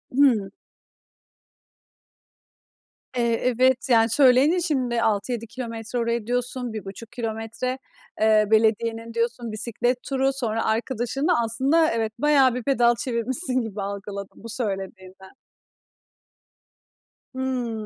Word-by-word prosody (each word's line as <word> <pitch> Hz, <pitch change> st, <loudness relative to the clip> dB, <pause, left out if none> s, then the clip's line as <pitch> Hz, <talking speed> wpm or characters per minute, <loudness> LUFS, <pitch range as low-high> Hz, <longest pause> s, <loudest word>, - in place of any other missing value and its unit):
Hımm. 245 Hz, -8 st, +4 dB, 2.7 s
Eee, 235 Hz, -1 st, +2 dB
evet. 255 Hz, +2 st, +2 dB
Yani, 225 Hz, -2 st, +5 dB
söyleyince 275 Hz, +7 st, +4 dB
şimdi, 255 Hz, -8 st, 0 dB
6-7 225 Hz, +2 st, -1 dB
kilometre 230 Hz, 0 st, -5 dB
oraya 235 Hz, -1 st, -1 dB
diyorsun, 245 Hz, 0 st, -2 dB
1,5 215 Hz, +2 st, -8 dB
kilometre. 230 Hz, +2 st, -4 dB, 0.4 s
Eee, 215 Hz, -1 st, +4 dB
belediyenin 225 Hz, +1 st, +1 dB
diyorsun, 235 Hz, 0 st, -2 dB
bisiklet 240 Hz, +3 st, -2 dB
turu. 270 Hz, 0 st, 0 dB
Sonra, 225 Hz, -4 st, -2 dB
arkadaşınla 245 Hz, +6 st, 0 dB
Aslında, 275 Hz, +8 st, +2 dB
evet, 225 Hz, -1 st, -1 dB
bayağı 275 Hz, -3 st, +4 dB
bir 250 Hz, -, -4 dB
pedal 240 Hz, -3 st, +3 dB
çevirmişsin 255 Hz, +3 st, -1 dB
gibi 215 Hz, -3 st, -5 dB
algıladım 200 Hz, 0 st, -6 dB
bu 230 Hz, -, -8 dB
söylediğinden. 190 Hz, -4 st, -5 dB, 2.0 s
Hmm, 250 Hz, -4 st, -3 dB
235 Hz, 100 wpm, -24 LUFS, 220-255 Hz, 2.7 s, Yani